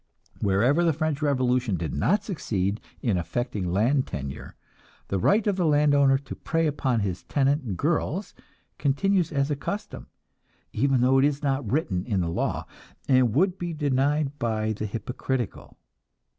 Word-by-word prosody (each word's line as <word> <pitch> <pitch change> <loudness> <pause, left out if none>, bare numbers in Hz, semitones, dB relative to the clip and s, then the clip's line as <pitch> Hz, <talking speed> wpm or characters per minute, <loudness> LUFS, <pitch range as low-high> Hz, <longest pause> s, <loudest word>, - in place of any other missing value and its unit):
Wherever 120 - +3
the 165 -2 +3
French 155 -1 -2
revolution 130 -6 +1
did 80 -4 -4
not 195 - +1
succeed 105 - -2 0.2
in 105 -7 +1
affecting 90 +1 -3
land 125 +8 +2
tenure, 70 0 -6 0.5
the 100 - 0
right 205 - +3
of 205 -3 +1
the 180 - +1
land 150 -1 +4
owner 140 -1 +5
to 135 0 -8
prey 165 0 -1
upon 135 -6 0
his 95 -3 -2
tenant 135 - 0
girls 170 +4 -1 0.5
continues 175 +5 +1
as 140 0 0
a - - +1
custom, 205 +8 -5 0.7
even 135 +1 +2
though 130 +2 +4
it 135 - +4
is 145 0 0
not 135 -6 -1
written 105 - 0
in 105 -5 0
the 85 -2 -1
law, - - -2 0.4
and 130 -4 +3
would 185 +4 +2
be 175 -1 -3
denied 145 0 0
by 110 -2 0
the 105 +1 -4
hypocritical. 120 +2 -4
135 Hz, 155 wpm, -26 LUFS, 110-150 Hz, 0.7 s, owner